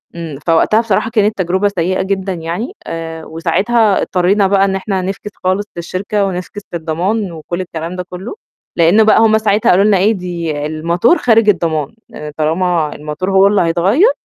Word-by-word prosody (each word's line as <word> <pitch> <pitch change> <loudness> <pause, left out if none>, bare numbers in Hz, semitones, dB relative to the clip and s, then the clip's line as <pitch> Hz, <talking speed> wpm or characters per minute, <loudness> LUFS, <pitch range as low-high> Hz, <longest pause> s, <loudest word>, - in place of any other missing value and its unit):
إمم. 160 -5 -6
فوقتها 175 +7 +3
بصراحة 225 0 0
كانت 215 -2 +1
تجربة 190 +2 +1
سيئة 185 -1 -1
جدًا 190 0 -2
يعني 175 - -4
آآ 165 -1 -6
وساعتها 195 +7 +1
اضطرينا 190 +2 +2
بقى 195 0 +3
إن 195 - -1
إحنا 190 -1 -2
نفكِس 195 +2 -5
خالص 185 +3 0
للشركة، 195 +4 -2
ونفكِس 190 +2 -5
للضمان 175 +5 -2
وكل 170 +2 -5
الكلام 170 0 -6
ده 180 - -4
كُلّه، 185 - -7 0.4
لإنّه 175 +6 +4
بقى 215 - +5
هم 220 -1 +4
ساعتها 210 -1 +1
قالوا 185 +2 +4
لنا 210 -2 +4
إيه 200 +4 +3
"دي 170 -6 -4
الموتور 170 - +1
خارج 225 -3 +3
الضمان، 160 -4 0
لإن 150 0 -8
طالما 160 0 0
الموتور 150 +6 -4
هو 195 +1 +5
اللي 200 0 +2
هيتغيّر، 190 - +3
185 Hz, 170 wpm, -15 LUFS, 165-205 Hz, 0.4 s, بقى